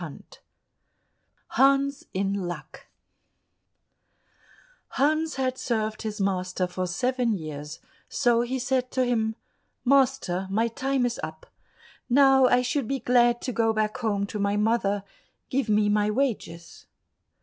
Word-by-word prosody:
83 - - -11 1.1
Hans 275 +1 +2
in 195 +1 -1
Luck 175 -7 -6 2.1
Hans 310 +3 +1
had 260 -1 -1
served 220 -2 -2
his 215 -2 -5
master 185 -1 -1
for 180 0 -3
seven 245 +5 0
years, 150 -1 -7 0.3
so 235 -1 +2
he 245 +2 -2
said 255 0 -1
to 260 - 0
him, 225 -2 0 0.5
"Master, 255 -9 +2
my 220 +4 +1
time 265 +2 0
is 240 -1 -2
up; 160 0 -7 0.6
now 270 0 +6
I 250 0 +3
should 250 0 -1
be 270 +2 -1
glad 240 0 +3
to 255 - -2
go 225 -1 +1
back 215 -1 -1
home 205 -4 0
to 210 +1 -6
my 200 0 +1
mother; 210 -2 +1 0.5
give 255 -3 0
me 210 0 +3
my 210 0 +2
wages." 210 -9 -3
230 Hz, 130 wpm, -26 LUFS, 200-260 Hz, 2.1 s, now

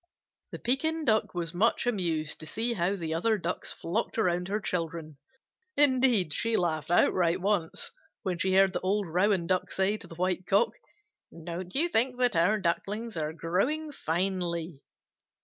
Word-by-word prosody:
The - - -5
Pekin 315 +6 0
Duck 220 -6 +1
was 170 -1 -3
much 220 +8 +2
amused 170 -9 -1
to 155 - -8
see 230 +8 -1
how 185 -1 0
the 165 -4 -4
other 215 +7 +1
Ducks 180 -1 -3
flocked 210 +9 -3
around 180 -4 +1
her 205 +2 -1
children. 165 -6 -4 0.6
Indeed, 255 - +4
she 230 +5 +1
laughed 160 -4 -1
outright 175 0 +3
once, 190 -4 -1 0.3
when 185 -4 -2
she 185 +2 +1
heard 195 0 +5
the - - -1
old 200 +2 0
Rouen 180 +2 +1
Duck 185 +1 0
say 195 +2 +1
to - - -13
the 165 - -11
White 185 +1 -1
Cock, 200 +4 +3 0.6
"Don't 170 +2 -7
you 320 +5 +4
think 250 -4 +2
that 245 -5 +2
our 180 +6 +3
Ducklings 205 +5 -2
are 155 -1 -2
growing 220 - -1
finely?" 170 - -2
185 Hz, 165 wpm, -29 LUFS, 170-220 Hz, 0.6 s, heard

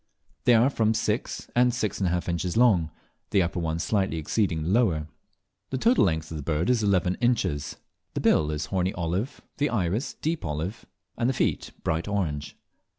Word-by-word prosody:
They 120 - +6
are 120 +5 +4
from 110 -3 +2
six - - -2
to 125 +1 +5
six 110 -4 -2
and 95 - +1
a - - +1
half 90 0 -1
inches 85 +2 -1
long, 100 -10 +4 0.4
the 100 -3 +3
upper 85 +1 -2
one 80 -1 -1
slightly 95 0 0
exceeding 80 0 0
the 80 - -2
lower. 95 -8 +2 0.6
The 130 - -2
total 235 - +4
length 80 -3 -1
of 80 - -4
the - - -4
bird 80 - 0
is 120 -3 +2
eleven 95 -4 +2
inches. 95 - 0 0.4
The - - -1
bill 75 - +3
is 75 -1 -2
horny 95 0 -1
olive, 90 +9 -2 0.2
the 145 0 +1
iris 110 +2 -1
deep 160 +1 -2
olive, 80 +7 -4 0.3
and 120 - +2
the 130 - 0
feet - - 0
bright 80 +3 -1
orange. 75 -8 -2
95 Hz, 190 wpm, -26 LUFS, 80-115 Hz, 0.6 s, They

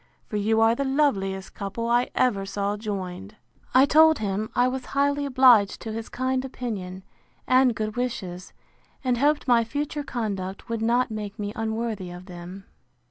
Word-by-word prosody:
for 215 - -7
you 215 +2 +2
are 225 0 +5
the 275 - -1
loveliest 205 -10 0
couple 205 +4 -4
I 240 +1 +2
ever 210 -6 +2
saw 200 +1 -2
joined. 200 -1 -5 0.4
I 260 +1 +8
told 315 +1 +6
him, 210 +1 -2
I 245 - +4
was 255 0 -3
highly 285 +2 0
obliged 250 -6 +5
to 225 - -5
his 225 0 -5
kind 260 0 -1
opinion, 200 -8 -5 0.4
and 255 -2 +4
good 215 -1 -3
wishes; 185 -8 -4 0.5
and 250 -2 +1
hoped 290 +1 +2
my 240 -2 +5
future 290 +5 -3
conduct 200 -7 -4
would 230 -1 -2
not 240 +2 +2
make 210 -1 -5
me 205 -1 -4
unworthy 220 -3 -3
of 175 +1 -10
them. 180 +1 -10
225 Hz, 165 wpm, -25 LUFS, 200-255 Hz, 0.5 s, I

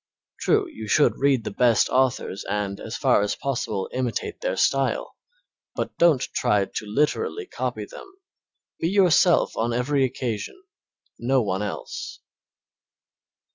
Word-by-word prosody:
True, - - +2
you 110 0 -9
should 145 +7 +3
read 135 -4 +2
the - - -4
best 120 +1 +3
authors 130 -6 0
and, 100 -1 -2
as 110 - -6
far 130 -6 +3
as 105 - -1
possible, 115 -7 -2
imitate 130 - -3
their - - -1
style, - - +1 0.6
but - - -3
don't 165 -7 +5
try 100 -1 +2
to 105 - -6
literally 150 - 0
copy - - -4
them. 455 -6 -12 0.7
Be 165 - 0
yourself 185 -2 +4
on 115 +1 -1
every 135 +3 +1
occasion 130 - -3 0.6
no 130 +1 +2
one 95 -1 -1
else. 105 -1 -6
125 Hz, 135 wpm, -24 LUFS, 105-150 Hz, 0.7 s, don't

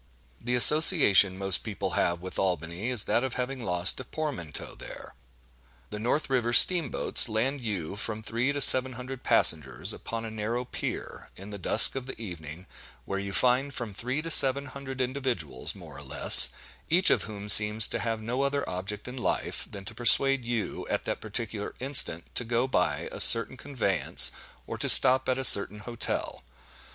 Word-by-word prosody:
The 125 +1 -4
association 125 - +4
most 95 -2 -1
people 100 -3 -7
have 85 0 -3
with 95 0 -9
Albany, 90 +3 -5
is 120 -4 -1
that 120 - -2
of 130 -2 -6
having 125 0 -6
lost 90 +1 -3
a - - -8
portmanteau 130 - -7
there. - - -13 0.8
The 105 - -8
north 125 +7 -3
river 120 -3 -3
steam 170 0 +5
boats - - -1
land 130 +6 -4
you 100 -9 -6
with 100 - -10
from 110 0 -7
three 115 +5 -4
to 145 0 -6
seven 130 -1 +6
hundred 130 +1 -11
passengers 75 - +3
upon 115 0 -9
a 110 - -9
narrow 110 +3 -6
pier, - - -9
in 100 +3 -13
the 100 - -10
dusk 90 - +4
of 135 -1 -8
the 130 - -11
evening, 85 -4 -11 0.4
where 100 - -6
you 100 0 -8
find 130 +6 -1
from 115 -4 -8
three 130 +9 -6
to 165 - -7
seven 140 -1 +4
hundred 135 -1 -10
individuals 125 - -5
(more - - -14
or - - -13
less), - - +8 0.4
each 175 +4 +2
of - - -1
whom 105 -1 -10
seems 105 +1 +6
to 120 - -5
have 115 +1 -5
no 125 +4 -5
other 140 +1 -4
object 100 +4 -7
in 125 +1 -10
life, 120 - -5
than 100 -1 -12
to - - -8
persuade 135 +2 +3
you, 120 -2 -6
at - - -4
that - - -7
particular 110 -1 -6
instant, 130 - +2
to - - -2
go 120 +2 -3
by 90 - -3
a - - -11
certain 115 +3 +5
conveyance, 110 - +1 0.3
or - - -9
to - - -2
stop 130 0 +5
at 130 - -2
a 135 - -6
certain 105 -3 +2
hotel. 120 +2 -6
115 Hz, 185 wpm, -25 LUFS, 100-130 Hz, 0.8 s, less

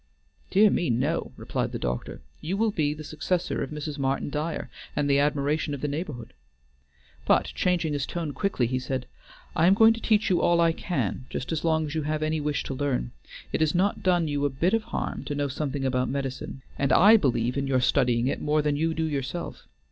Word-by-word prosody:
"Dear 205 +1 +5
me, 175 - 0
no," 135 +8 0
replied - - -3
the - - -1
doctor. - - -4 0.2
"You 185 +5 -3
will 220 0 +2
be 150 -6 0
the 155 - -8
successor 160 +4 -2
of 135 - -3
Mrs. 150 -1 -5
Martin 135 +1 -1
Dyer, 155 +2 -3 0.2
and 145 -1 +1
the 140 0 +4
admiration 145 +1 0
of 140 - -9
the 150 - -1
neighborhood;" 140 - -5 0.9
but - - +4
changing 175 -4 +1
his 140 -1 -2
tone 165 -4 -3
quickly, 195 - 0
he 130 +2 -1
said: 130 0 -3 0.5
"I 165 - +4
am 190 - +6
going 225 +1 +7
to 225 - -8
teach 215 -3 +2
you 175 - +3
all 170 0 +3
I 165 -1 +4
can, 130 - -3
just 130 - -4
as 160 -2 -2
long 160 -1 +2
as 150 - -5
you 160 - -1
have 155 +1 -1
any 155 0 0
wish 150 -1 -1
to - - -4
learn. 130 - -1 0.4
It - - 0
has 155 +2 +2
not 195 +3 +1
done 175 -3 +2
you 145 -1 -1
a 145 - +3
bit 165 +9 0
of 225 -1 +1
harm - - -4
to 145 - -3
know 145 0 0
something 140 0 -3
about 130 -1 0
medicine, 135 0 -4 0.2
and 140 - +1
I 210 +5 +8
believe 125 - +1
in 140 0 -1
your 130 -1 +2
studying 125 -2 +2
it 135 - -1
more 150 0 +1
than 150 -1 +1
you 160 +2 0
do 160 - -1
yourself. 145 +2 -4
150 Hz, 220 wpm, -26 LUFS, 135-165 Hz, 0.9 s, I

